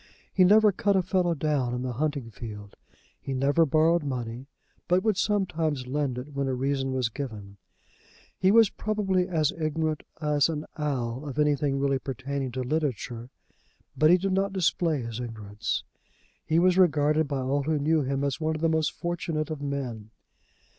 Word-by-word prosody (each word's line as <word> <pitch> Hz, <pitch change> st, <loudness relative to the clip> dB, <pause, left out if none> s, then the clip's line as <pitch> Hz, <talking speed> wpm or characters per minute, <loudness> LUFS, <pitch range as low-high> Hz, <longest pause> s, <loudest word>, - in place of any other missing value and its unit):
He 185 Hz, -, +5 dB
never 210 Hz, +3 st, +6 dB
cut 200 Hz, 0 st, +1 dB
a 190 Hz, -, +3 dB
fellow 180 Hz, -2 st, +1 dB
down 140 Hz, -5 st, 0 dB
in 125 Hz, -, -3 dB
the 125 Hz, -1 st, -3 dB
hunting 140 Hz, -3 st, -2 dB
field. 105 Hz, -2 st, -9 dB, 0.5 s
He 135 Hz, -, -4 dB
never 145 Hz, +5 st, +3 dB
borrowed 160 Hz, +4 st, +3 dB
money, 125 Hz, -2 st, -4 dB, 0.4 s
but 180 Hz, +1 st, +3 dB
would 220 Hz, -2 st, +2 dB
sometimes 165 Hz, -9 st, 0 dB
lend 135 Hz, -1 st, -1 dB
it 140 Hz, +4 st, -7 dB
when 140 Hz, 0 st, -1 dB
a 130 Hz, -, 0 dB
reason 135 Hz, +1 st, -1 dB
was 130 Hz, -3 st, 0 dB
given. 110 Hz, -6 st, -7 dB, 0.8 s
He 185 Hz, -, +2 dB
was 225 Hz, 0 st, +6 dB
probably 195 Hz, -4 st, 0 dB
as 160 Hz, -5 st, +1 dB
ignorant 155 Hz, -1 st, -2 dB, 0.2 s
as 150 Hz, -1 st, +2 dB
an 155 Hz, -1 st, -3 dB
owl 140 Hz, -3 st, -2 dB
of 135 Hz, -, -7 dB
anything 145 Hz, -2 st, +2 dB
really 140 Hz, -1 st, +1 dB
pertaining 135 Hz, +1 st, -4 dB
to 130 Hz, 0 st, -2 dB
literature, 125 Hz, -4 st, -2 dB, 0.7 s
but 155 Hz, -, +4 dB
he 180 Hz, -, +7 dB
did 195 Hz, +2 st, -1 dB
not 195 Hz, +1 st, 0 dB
display 170 Hz, -6 st, +1 dB
his 115 Hz, 0 st, -5 dB
ignorance. 110 Hz, -2 st, -4 dB, 0.6 s
He 160 Hz, -, +2 dB
was 180 Hz, +2 st, +4 dB
regarded 155 Hz, -3 st, +3 dB
by 140 Hz, -2 st, -2 dB
all 135 Hz, +2 st, 0 dB
who 155 Hz, +2 st, 0 dB
knew 155 Hz, +2 st, +2 dB
him 135 Hz, 0 st, -1 dB
as 140 Hz, +3 st, -2 dB
one 155 Hz, 0 st, 0 dB
of 155 Hz, -, -5 dB
the 165 Hz, -, +3 dB
most 160 Hz, -1 st, +1 dB
fortunate 165 Hz, -2 st, -3 dB
of 150 Hz, -2 st, -5 dB
men. 130 Hz, -7 st, -4 dB
145 Hz, 175 wpm, -27 LUFS, 130-165 Hz, 0.8 s, he